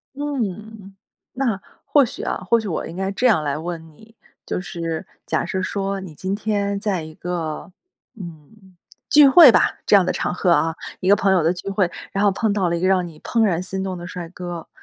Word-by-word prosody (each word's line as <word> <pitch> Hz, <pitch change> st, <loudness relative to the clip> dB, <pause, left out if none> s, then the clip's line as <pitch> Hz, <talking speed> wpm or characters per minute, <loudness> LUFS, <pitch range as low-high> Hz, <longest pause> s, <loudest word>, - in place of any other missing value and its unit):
嗯， 220 Hz, -8 st, -5 dB, 0.4 s
那 240 Hz, -7 st, -1 dB, 0.2 s
或 290 Hz, -, +5 dB
许 -, -, -7 dB
啊， -, -, -2 dB
或 235 Hz, -, +5 dB
许 220 Hz, -, -5 dB
我 170 Hz, -, -3 dB
应 165 Hz, -, -9 dB
该 190 Hz, +1 st, -2 dB
这 245 Hz, +6 st, +1 dB
样 195 Hz, -10 st, +3 dB
来 145 Hz, -1 st, -1 dB
问 165 Hz, 0 st, -6 dB
你， 220 Hz, +8 st, -19 dB, 0.3 s
就 -, -, -2 dB
是 170 Hz, -1 st, -5 dB, 0.2 s
假 -, -, -1 dB
设 190 Hz, -, -2 dB
说 195 Hz, +1 st, -2 dB
你 175 Hz, -5 st, -10 dB
今 190 Hz, +5 st, -3 dB
天 200 Hz, -1 st, -1 dB
在 200 Hz, -5 st, -1 dB
一 155 Hz, 0 st, -10 dB
个， 170 Hz, 0 st, -5 dB, 0.4 s
嗯， 185 Hz, +1 st, -12 dB, 0.3 s
聚 295 Hz, -1 st, +8 dB
会 290 Hz, -1 st, +9 dB
吧， -, -, +2 dB
这 -, -, +5 dB
样 195 Hz, -2 st, +5 dB
的 -, -, +1 dB
场 -, -, -2 dB
合 180 Hz, 0 st, +1 dB
啊， 165 Hz, -1 st, +2 dB, 0.2 s
一 185 Hz, -, -1 dB
个 200 Hz, -, +7 dB
朋 195 Hz, -1 st, +1 dB
友 185 Hz, -3 st, +3 dB
的 165 Hz, +3 st, +2 dB
聚 180 Hz, +2 st, -6 dB
会， 195 Hz, -3 st, +1 dB, 0.2 s
然 195 Hz, -, 0 dB
后 200 Hz, -, +5 dB
碰 215 Hz, +3 st, 0 dB
到 190 Hz, -4 st, +1 dB
了 170 Hz, -, 0 dB
一 -, -, -2 dB
个 185 Hz, -, +2 dB
让 185 Hz, -2 st, +2 dB
你 160 Hz, -2 st, -13 dB
怦 230 Hz, -1 st, 0 dB
然 180 Hz, -5 st, +1 dB
心 190 Hz, +1 st, -4 dB
动 190 Hz, -1 st, -4 dB
的 175 Hz, 0 st, -8 dB
帅 175 Hz, -2 st, -7 dB
哥。 175 Hz, -2 st, -7 dB
190 Hz, 240 characters per minute, -21 LUFS, 175-210 Hz, 0.4 s, 会